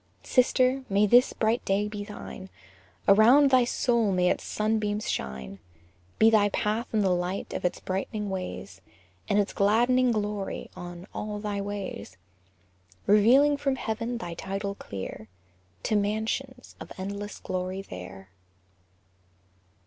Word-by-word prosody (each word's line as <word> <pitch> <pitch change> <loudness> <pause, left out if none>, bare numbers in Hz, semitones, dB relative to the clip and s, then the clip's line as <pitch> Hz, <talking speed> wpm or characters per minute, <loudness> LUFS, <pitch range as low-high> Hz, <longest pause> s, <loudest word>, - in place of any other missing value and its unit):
Sister, 255 +1 +2
may 200 +1 +3
this 245 +5 +5
bright 225 +2 0
day 200 +2 +1
be 210 -1 -5
thine! 205 -2 -9 0.6
Around 245 +8 +6
thy 255 -2 +5
soul 235 -3 +1
may 180 -1 +3
its - - -2
sunbeams 215 -1 -1
shine! 65 +7 -4 0.6
Be 220 +1 +6
thy 205 -2 +4
path 215 +4 -1
in 215 - +2
the 190 -2 +2
light 180 +2 -3
of - - -4
its 180 - -1
brightening 200 +2 -3
rays, 140 - -6 0.5
And 200 - +2
its 205 -1 +1
gladdening 240 +5 +3
glory 210 -2 -3
on 175 0 -8
"all 210 0 -4
thy 205 -1 -3
ways;" 200 - -6 0.9
Revealing 255 +8 +5
from 275 -1 0
heaven 230 0 -3
thy 175 -7 -6
title 195 +3 -4
clear, 100 - -7 0.6
"To 215 - 0
mansions" 220 +5 -2
of - - -10
endless 200 +2 -5
glory 185 +1 -4
there! 90 - -10
205 Hz, 135 wpm, -27 LUFS, 190-230 Hz, 0.9 s, Around